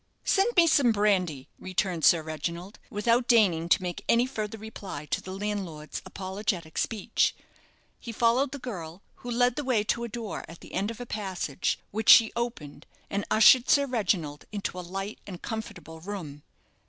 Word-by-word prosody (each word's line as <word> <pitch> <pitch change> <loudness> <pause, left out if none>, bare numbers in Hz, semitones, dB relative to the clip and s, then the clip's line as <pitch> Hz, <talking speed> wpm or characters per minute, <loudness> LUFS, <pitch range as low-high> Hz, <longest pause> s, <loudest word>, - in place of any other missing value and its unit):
"Send 415 +5 +2
me 340 - +8
some 280 -7 +4
brandy," 185 -10 +1
returned 185 -3 -2
Sir 165 -2 +5
Reginald, 170 +5 -5
without 235 +2 +1
deigning 180 -9 +3
to 185 - +4
make 175 -1 -4
any 235 +1 +4
further 220 -4 -4
reply 200 -8 -8
to - - -2
the 185 - -8
landlord's 190 -6 -4
apologetic 190 -4 -3
speech. 220 -4 0 0.6
He 235 - -7
followed 240 +4 +2
the 285 - -5
girl, 185 - -7
who 245 - -9
led 245 +1 +2
the 295 - -1
way 250 -6 +1
to 235 +2 -1
a - - -3
door 225 -2 -5
at 165 +1 -12
the - - -13
end 200 +3 -1
of 230 - -7
a 245 - -5
passage, 190 - -2
which 220 +1 -1
she 225 -1 +8
opened, 235 -12 -5 0.2
and 200 +1 -1
ushered 240 +3 +6
Sir 280 -1 +5
Reginald 185 - -1
into 200 -3 -4
a - - -3
light 195 +4 -6
and 180 -3 -7
comfortable 170 -8 -7
room. 160 -6 -7
205 Hz, 175 wpm, -27 LUFS, 175-235 Hz, 0.6 s, me